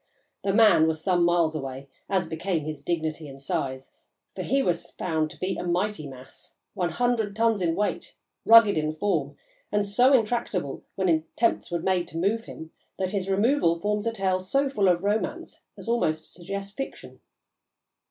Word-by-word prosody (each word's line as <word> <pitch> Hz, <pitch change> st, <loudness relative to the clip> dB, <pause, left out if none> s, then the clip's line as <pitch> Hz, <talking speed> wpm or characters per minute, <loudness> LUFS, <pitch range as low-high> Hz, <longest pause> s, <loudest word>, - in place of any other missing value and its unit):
The 195 Hz, -, +1 dB
"man" 205 Hz, -7 st, +6 dB
was 160 Hz, -1 st, -1 dB
some 175 Hz, +1 st, +2 dB
miles 170 Hz, -2 st, +3 dB
away, 135 Hz, -2 st, -6 dB, 0.2 s
as 190 Hz, -2 st, +1 dB
became 160 Hz, 0 st, -2 dB
his 155 Hz, -1 st, -5 dB
dignity 160 Hz, -2 st, -2 dB
and 135 Hz, -1 st, -10 dB
size, 135 Hz, -1 st, -3 dB, 0.4 s
for -, -, -4 dB
he 275 Hz, 0 st, +1 dB
was 175 Hz, -6 st, -1 dB
found 160 Hz, -3 st, -1 dB
to -, -, -14 dB
be 185 Hz, -, -1 dB
a -, -, -4 dB
mighty 180 Hz, -2 st, -1 dB
mass, 130 Hz, -1 st, -12 dB, 0.2 s
one 175 Hz, -2 st, -1 dB
hundred 235 Hz, -4 st, 0 dB
tons 225 Hz, -2 st, +2 dB
in 165 Hz, -2 st, +1 dB
weight, 205 Hz, +3 st, -2 dB, 0.3 s
rugged 225 Hz, -6 st, +7 dB
in 155 Hz, 0 st, -2 dB
form, 205 Hz, +5 st, -1 dB, 0.3 s
and 205 Hz, 0 st, +1 dB
so 245 Hz, +7 st, +4 dB
intractable 220 Hz, -, 0 dB
when 190 Hz, -1 st, 0 dB
attempts 165 Hz, +8 st, +1 dB
were 170 Hz, -2 st, -2 dB
made 185 Hz, -2 st, +1 dB
to 165 Hz, -, -8 dB
move 210 Hz, +6 st, 0 dB
him, 160 Hz, 0 st, -10 dB, 0.3 s
that 185 Hz, -1 st, -1 dB
his 195 Hz, -2 st, -2 dB
removal 195 Hz, -4 st, +2 dB
forms 210 Hz, +3 st, -1 dB
a -, -, +1 dB
tale 190 Hz, -4 st, 0 dB
so 275 Hz, +10 st, 0 dB
full 205 Hz, -8 st, +1 dB
of 175 Hz, 0 st, +2 dB
romance 210 Hz, +2 st, -2 dB, 0.2 s
as -, -, -10 dB
almost 160 Hz, -10 st, 0 dB
to -, -, -16 dB
suggest 195 Hz, +3 st, -7 dB
fiction. 270 Hz, -, -7 dB
185 Hz, 180 wpm, -26 LUFS, 160-210 Hz, 0.4 s, rugged